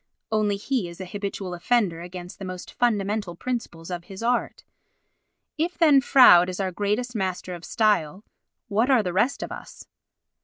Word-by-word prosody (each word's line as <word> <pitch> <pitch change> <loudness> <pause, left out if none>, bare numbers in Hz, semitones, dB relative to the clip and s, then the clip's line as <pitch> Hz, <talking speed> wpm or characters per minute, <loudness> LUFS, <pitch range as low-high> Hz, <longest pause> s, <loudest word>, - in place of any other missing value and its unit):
only 210 -2 +1
he 210 -3 -2
is 170 - -12
an 190 - -5
habitual 195 -1 -5
offender 175 -2 0
against 180 0 -9
the - - -7
most 185 -1 -7
fundamental 205 -5 0
principles 185 -7 -5
of 175 -1 -5
his 195 +3 -9
art. 245 +1 -1 1.0
If 340 +3 -1
then 300 -5 +6
Froude 185 -10 +7
is 185 - -5
our 190 -1 -1
greatest 210 +6 -2
master 185 -2 -3
of 175 -1 -9
style, 205 -4 0 0.4
what 225 +5 +1
are 255 -5 +4
the 180 -2 -3
rest 235 +9 +1
of - - -7
us? - - -10
200 Hz, 165 wpm, -25 LUFS, 180-235 Hz, 1.0 s, Froude